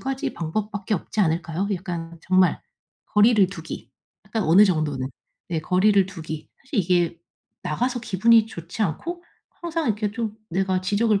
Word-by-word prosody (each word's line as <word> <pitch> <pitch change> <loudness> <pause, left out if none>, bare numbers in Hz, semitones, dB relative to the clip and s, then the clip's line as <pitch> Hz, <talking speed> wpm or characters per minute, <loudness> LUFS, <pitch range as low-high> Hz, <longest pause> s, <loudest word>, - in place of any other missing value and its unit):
가지 270 0 -2
방법밖에 205 +5 -2
없지 210 +3 -3
않을까요? 170 +2 0
약간 170 -2 -6
정말 185 0 +3 0.5
거리를 210 -1 +6
두기 195 - -8 0.4
약간 220 -2 -1
어느 175 +7 +7
정도는. 155 -8 0 0.4
네 165 -2 -1
거리를 190 +3 +3
두기. 160 -4 -7
사실 270 -3 -3
이게 175 -2 +2 0.4
나가서 245 +10 -1
기분이 225 +1 +4
좋지 170 0 -9
않고 335 - -3 0.3
항상 330 -1 -3
이렇게 210 -1 0
좀 225 -1 -3 0.2
'내가 185 +1 +1
지적을 205 +2 +2
195 Hz, 315 characters per minute, -24 LUFS, 170-220 Hz, 0.5 s, 어느